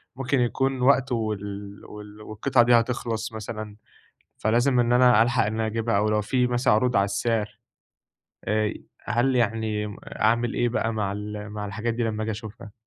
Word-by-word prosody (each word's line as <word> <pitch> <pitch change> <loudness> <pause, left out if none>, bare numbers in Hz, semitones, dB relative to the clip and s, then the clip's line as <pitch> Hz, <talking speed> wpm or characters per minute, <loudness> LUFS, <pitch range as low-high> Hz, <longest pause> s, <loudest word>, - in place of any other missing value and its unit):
ممكن 135 +1 0
يكون 130 +2 0
وقته 130 -1 +3
وال 100 -2 -5
وال 105 0 -11
والقطعة 120 +4 +1
دي 120 +1 +3
هتخلص 115 -1 0
مثلًا، 110 -1 -6 0.6
فلازم 120 +4 +2
إن 120 0 +2
أنا 125 -3 +6
ألحق 120 0 +2
إن 105 - -2
أنا 110 0 -1
أجيبها، 115 -1 0
أو 105 +1 +1
لو 105 0 +1
في 125 +4 +1
مثلًا 120 -2 +2
عروض 120 +3 +2
على 100 - +4
السعر، 105 0 -2 0.9
آآ، 110 +1 +1
ي 105 - -5 0.2
هل 120 +3 +1
يعني 110 -3 -1
أعمل 115 +2 0
إيه 120 - +1
بقى 115 -1 -1
مع 105 -3 -1
ال 105 +1 -6
مع 105 0 -5
الحاجات 110 +4 -3
دي 120 +1 -2
لما 110 -1 -2
آجي 110 - -2
أشوفها؟ 105 0 -9
110 Hz, 175 wpm, -25 LUFS, 105-120 Hz, 0.9 s, أنا